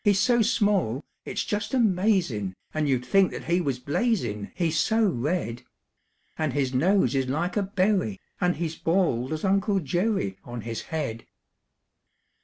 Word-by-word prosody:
"] - - -43
He's 205 -3 +4
so 240 +1 +4
small, 205 - +1 0.2
it's - - -3
just 205 +4 -2
amazin', 185 - +1 0.2
And 155 -2 0
you 130 - +3
'd 125 - -9
think 195 -2 +4
that - - -7
he 175 +2 +1
was 140 -6 -1
blazin', 140 - -1
He's 165 -3 0
so 225 0 +2
red; 140 -5 -1 0.8
And 155 -4 0
his 135 -2 0
nose 160 - +3
is 135 -1 0
like 165 +7 -1
a 210 - +2
berry, 195 +1 0 0.2
And 180 -2 +2
he's 165 -1 -3
bald 160 -8 +1
as 155 0 -3
Uncle 195 +1 +2
Jerry 175 - -1
On 120 -1 -6
his 115 0 -4
head. 135 -9 -4
170 Hz, 165 wpm, -26 LUFS, 130-200 Hz, 0.8 s, He's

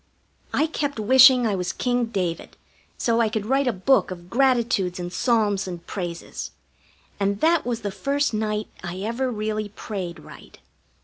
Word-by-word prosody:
I 310 - +2
kept 290 -5 -3
wishing 255 +2 +7
I 215 - +1
was 180 -2 -1
King 245 -1 0
David, 185 -7 -4 0.4
so 235 0 +1
I 225 - +2
could 215 -1 -3
write 270 +3 +1
a - - +3
book 230 +7 +2
of 175 -1 -9
gratitudes 235 -8 +2
and 175 0 -5
psalms 210 -4 +1
and 175 -2 -7
praises, 175 -3 -5 0.7
and 200 0 0
that 330 -4 +3
was 235 -1 -2
the 205 -2 -3
first 275 +8 -1
night 215 0 -1 0.2
I 180 +1 -5
ever 235 +5 -1
really 215 -1 -3
prayed 190 -4 -6
right. - - -14
215 Hz, 165 wpm, -24 LUFS, 190-250 Hz, 0.7 s, wishing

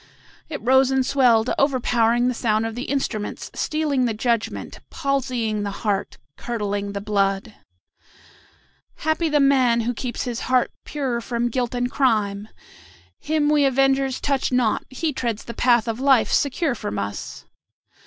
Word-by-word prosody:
It 290 -8 -6
rose 265 +1 +5
and 265 -1 +1
swelled, 245 -4 +3
overpowering 245 -3 +2
the 250 - +1
sound 220 -2 0
of 225 - -3
the 245 +3 -5
instruments, 240 -7 -3
stealing 300 -4 0
the 225 -3 -1
judgment, 230 0 -2
palsying 250 -6 -1
the 205 - -2 0.2
heart, 200 -1 -1 0.2
curdling 205 -4 -3
the 200 - -3
blood. 200 +1 0 1.4
"Happy 315 +1 0
the 295 -1 +2
man 260 -4 +4
who 240 +2 -1
keeps 240 0 -4
his 245 -2 -3
heart 255 -1 +2
pure 260 -5 -2
from 235 0 -1
guilt 245 0 -2
and 245 0 -1
crime! 210 -6 +1 0.7
Him 305 -1 0
we 300 -1 +3
avengers 270 0 +2
touch 275 -2 0
not; 250 -3 +1
he 300 +4 -2
treads 235 -4 -3
the 235 - -7
path 240 -2 +3
of 225 +1 -2
life 265 -3 +3
secure 280 +1 +1
from 210 -3 -5
us. 100 0 -5
245 Hz, 150 wpm, -22 LUFS, 225-270 Hz, 1.4 s, rose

